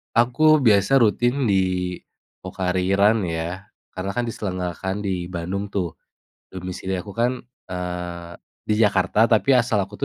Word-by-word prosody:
Aku 150 +6 +4
biasa 110 +3 +4
rutin 120 +3 +2
di 90 -2 0 0.4
Pocari 95 0 -1
Run 105 +1 +3
ya, 85 +3 -4 0.3
karena 95 +1 -3
kan 120 - 0
diselenggarakan 95 -1 -4
di 95 -3 -2
Bandung 95 +3 -4
tuh. 90 -5 -2 0.6
Domisili 95 +1 -5
aku 100 +2 -11
kan, 125 +2 0 0.2
eee, 90 -1 -6 0.2
di 105 - -1
Jakarta 105 0 +3
tapi 120 +4 +3
asal 115 -4 +2
aku 100 +2 -7
95 Hz, 130 wpm, -22 LUFS, 90-110 Hz, 0.6 s, Aku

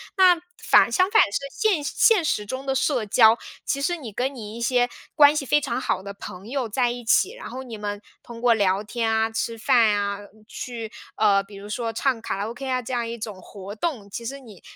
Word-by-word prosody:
那 365 -3 +6 0.2
反， - - +5
相 370 +1 +2
反 - - +7
是 200 - -1
现 405 - +1
现 375 +6 +3
实 210 -9 0
中 260 +5 -5
的 270 - 0
社 265 -3 0
交， 220 +2 +5 0.3
其 275 - -1
实 350 +5 0
你 245 -9 -9
跟 260 +6 -1
你 220 -4 -8
一 235 - -7
些 245 0 +2 0.2
关 295 -1 +6
系 300 -2 -1
非 295 +3 +3
常 235 - -2
好 185 - -1
的 200 - -7
朋 200 -1 -10
友 265 -3 -2
在 240 +2 +1
一 245 0 -7
起。 380 - +3
然 - - -9
后 260 +2 -7
你 235 -4 -8
们 205 0 -5 0.2
通 230 -1 -10
过 240 -1 +5
聊 200 -2 +1
天 225 +1 -2
啊， 220 0 +2
吃 230 +1 -3
饭 225 -2 +4
啊， 200 0 -2 0.3
去， 230 -3 -6 0.2
呃， 200 -2 +3
比 200 +1 -14
如 200 +1 -10
说 225 +1 -3
唱 250 -1 0
卡 - - -3
拉 205 - -3
ok 255 +3 -7
啊 255 -1 0
这 240 - -8
样 235 -1 -1
一 230 +1 -5
种 210 -4 -7
活 200 +2 -9
动。 225 -7 -3
其 230 +4 -7
实 275 +4 -5
你 220 -8 -15
235 Hz, 250 characters per minute, -24 LUFS, 210-270 Hz, 0.3 s, 反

